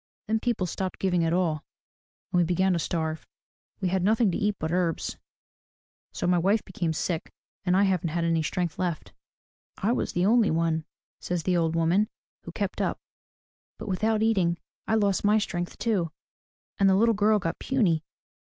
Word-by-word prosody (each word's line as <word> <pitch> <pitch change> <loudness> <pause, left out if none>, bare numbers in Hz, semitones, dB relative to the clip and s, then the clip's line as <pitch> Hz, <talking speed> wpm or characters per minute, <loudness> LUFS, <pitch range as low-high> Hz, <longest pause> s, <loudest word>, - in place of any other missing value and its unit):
Then 220 +1 +1
people 230 -5 0
stopped 185 +1 -3
giving 180 -3 +1
at 165 - +1
all 170 -3 +1 0.7
and 180 - +3
we - - +5
began 180 +2 +2
to 170 - +1
starve. 160 -1 -2 0.5
We 185 - +1
had 190 +1 +1
nothing 215 0 +3
to - - -1
eat 205 0 +1
but 160 +1 -3
herbs. 175 -2 0 1.0
So - - -4
my 175 0 +3
wife 200 +5 +2
became 180 -4 -2
sick 160 +1 -2 0.3
and 180 0 +3
I 200 - +5
haven't 185 -4 +1
any 165 0 +1
strength 170 +1 -2
left.'' 175 -4 -3 0.6
"I 210 - +1
was 245 - -1
the 175 +1 +1
only 225 +1 +4
one," 160 -1 0 0.3
says 175 -2 -2
the 180 +1 +1
old 165 -1 +1
woman, 175 +6 +2 0.4
"who - - -6
kept - - -3
up. - - -1 0.8
But - - -7
without 215 +3 +1
eating 185 -7 +2 0.3
I 220 - +2
lost 200 -3 +2
my 210 +1 +4
strength 175 -4 -3
too, 200 -8 0 0.7
and 195 -1 +5
the 190 - +5
little 230 +3 +4
girl 210 +1 +3
got 165 -4 -3
puny. 190 - +1
180 Hz, 180 wpm, -27 LUFS, 170-205 Hz, 1.0 s, we